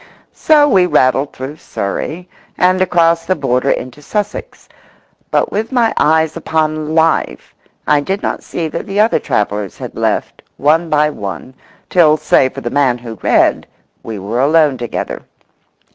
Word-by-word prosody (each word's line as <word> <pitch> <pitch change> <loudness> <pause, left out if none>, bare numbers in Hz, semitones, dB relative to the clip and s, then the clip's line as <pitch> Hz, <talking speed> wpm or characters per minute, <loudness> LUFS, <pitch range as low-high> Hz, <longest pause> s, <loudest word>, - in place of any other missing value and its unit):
So 300 -2 +4
we 190 -9 +4
rattled 140 -2 +2
through 135 +4 -7
Surrey 155 - -5 0.3
and 185 +1 +2
across 170 -2 +2
the 185 - +2
border 135 -3 0
into 130 +3 -3
Sussex. 210 - -5 0.6
But - - +1
with 220 +4 -2
my 240 -3 +2
eyes 160 +1 +2
upon 155 -1 -1
life 160 - 0 0.3
I 150 - +3
did 190 +7 -3
not - - -2
see 165 -2 -4
that - - -5
the 200 +1 -2
other 220 +2 +3
travellers 105 -1 -2
had - - -7
left, - - -2 0.2
one 160 +4 +2
by 150 0 +2
one, 105 +2 -7 0.3
till, 155 -4 +4
save 135 -4 +2
for 135 - -6
the 120 - -4
man 135 -4 +2
who 115 -3 -9
read, - - +2 0.3
we 110 -2 -6
were 105 +5 -3
alone 150 0 +3
together. 120 -2 -4
155 Hz, 155 wpm, -15 LUFS, 130-175 Hz, 0.6 s, So